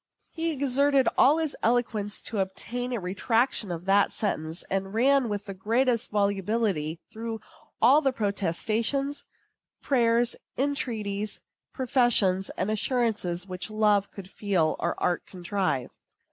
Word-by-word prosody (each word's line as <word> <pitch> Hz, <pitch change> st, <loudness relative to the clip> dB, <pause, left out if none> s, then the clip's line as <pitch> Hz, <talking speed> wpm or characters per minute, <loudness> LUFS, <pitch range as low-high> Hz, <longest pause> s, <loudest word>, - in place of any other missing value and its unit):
He 330 Hz, 0 st, -2 dB
exerted 280 Hz, -1 st, +2 dB
all 290 Hz, +4 st, +5 dB
his 320 Hz, -3 st, -1 dB
eloquence 225 Hz, -3 st, 0 dB
to 215 Hz, -, -3 dB
obtain 240 Hz, +6 st, -3 dB
a 240 Hz, -, -1 dB
retraction 220 Hz, +4 st, 0 dB
of 170 Hz, +1 st, -5 dB
that 200 Hz, +1 st, +4 dB
sentence, 160 Hz, -5 st, -3 dB
and 195 Hz, +1 st, -3 dB
ran 265 Hz, +1 st, +3 dB
with 205 Hz, -1 st, -3 dB
the 195 Hz, -, -6 dB
greatest 230 Hz, +5 st, +1 dB
volubility 200 Hz, -5 st, 0 dB
through 225 Hz, 0 st, -5 dB, 0.4 s
all 270 Hz, +6 st, +7 dB
the 270 Hz, -, +2 dB
protestations, 225 Hz, -, -1 dB, 0.5 s
prayers, 235 Hz, -3 st, +2 dB, 0.2 s
entreaties, 220 Hz, -7 st, -2 dB, 0.3 s
professions, 235 Hz, -8 st, +2 dB
and 190 Hz, +4 st, 0 dB
assurances 215 Hz, -6 st, 0 dB
which 185 Hz, +1 st, -5 dB
love 210 Hz, -2 st, +2 dB
could 195 Hz, -2 st, -10 dB
feel 190 Hz, -6 st, 0 dB
or -, -, -2 dB
art 175 Hz, -, 0 dB
contrive. 180 Hz, -7 st, -2 dB
215 Hz, 125 wpm, -27 LUFS, 195-245 Hz, 0.5 s, all